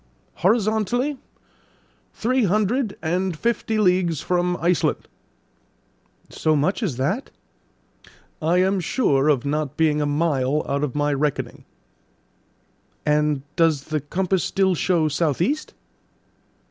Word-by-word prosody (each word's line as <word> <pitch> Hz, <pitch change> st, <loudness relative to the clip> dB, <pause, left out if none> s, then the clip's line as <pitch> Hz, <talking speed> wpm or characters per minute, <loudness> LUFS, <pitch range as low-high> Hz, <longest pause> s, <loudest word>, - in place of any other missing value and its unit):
"Horizontally, 220 Hz, +6 st, +1 dB, 0.9 s
three 255 Hz, +1 st, 0 dB
hundred 215 Hz, +4 st, 0 dB
and 180 Hz, +1 st, -1 dB
fifty 225 Hz, +1 st, -1 dB
leagues 180 Hz, -6 st, +2 dB
from 180 Hz, 0 st, 0 dB
Iceland." 175 Hz, +1 st, 0 dB, 1.2 s
"So 155 Hz, -1 st, +1 dB
much 165 Hz, -, 0 dB
as 165 Hz, -, -2 dB
that?" 170 Hz, -, -1 dB, 1.1 s
"I 165 Hz, +3 st, +2 dB
am 190 Hz, +1 st, +2 dB
sure 155 Hz, -, +1 dB
of 140 Hz, -4 st, +2 dB
not 150 Hz, 0 st, -2 dB
being 155 Hz, -2 st, +2 dB
a 145 Hz, -, 0 dB
mile 145 Hz, -2 st, 0 dB
out 140 Hz, +1 st, -1 dB
of 145 Hz, -3 st, -2 dB
my 145 Hz, 0 st, +1 dB
reckoning." 145 Hz, 0 st, -2 dB, 1.4 s
"And 150 Hz, -2 st, +1 dB
does 160 Hz, -4 st, +2 dB
the 155 Hz, +1 st, -2 dB
compass 185 Hz, +5 st, -1 dB
still 190 Hz, -1 st, +1 dB
show 170 Hz, -2 st, +1 dB
south 150 Hz, -1 st, 0 dB
east?" 290 Hz, -, -1 dB
170 Hz, 115 wpm, -22 LUFS, 150-195 Hz, 1.4 s, leagues